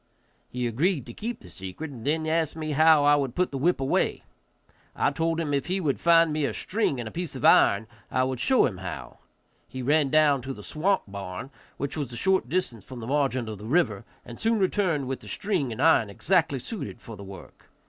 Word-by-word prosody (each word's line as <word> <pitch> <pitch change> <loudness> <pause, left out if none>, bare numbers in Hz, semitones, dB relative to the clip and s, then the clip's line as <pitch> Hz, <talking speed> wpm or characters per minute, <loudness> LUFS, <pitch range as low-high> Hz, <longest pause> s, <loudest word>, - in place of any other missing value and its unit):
He 125 0 -3
agreed 140 - 0
to 120 - -9
keep 235 - -5
the - - -13
secret, 95 - -7
and 120 -5 -10
then 155 +3 0
asked 160 -1 0
me 155 -1 -4
how 155 0 +5
I 145 0 +6
would 135 -4 -1
put 180 0 +1
the 140 - -3
whip 175 +4 +2
away. 135 0 0 0.7
I - - +2
told 165 0 -1
him 155 -3 -1
if 140 +1 0
he 185 +2 0
would 150 -7 -1
find 165 -2 +5
me 155 0 -1
a - - -1
string 195 - -1
and 120 - -4
a - - -7
piece 170 -5 -5
of 130 - -3
iron 100 +2 +5 0.2
I 130 - +1
would 130 -1 -2
show 260 - +4
him 95 -7 -3
how. 95 -1 -7 0.5
He 130 -1 -6
ran 145 +1 +3
down 150 -2 +4
to 135 +2 -5
the 105 - -11
swamp 190 - 0
barn, 100 +5 -7 0.3
which 140 +1 -3
was 140 -5 -3
a 120 - -6
short 190 -6 +1
distance 140 - -2
from 130 -2 -9
the 115 - -6
margin 130 -3 0
of 110 -3 -6
the 105 - -9
river, 115 - +1 0.2
and 120 - -10
soon 225 0 +2
returned 185 -8 +1
with 135 0 -3
the - - -12
string 180 - -1
and 110 - -6
iron 160 -10 +4
exactly 160 - +1
suited 200 - -6
for 115 - -10
the 100 - -10
work. 95 -2 -13
145 Hz, 230 wpm, -26 LUFS, 120-165 Hz, 0.7 s, I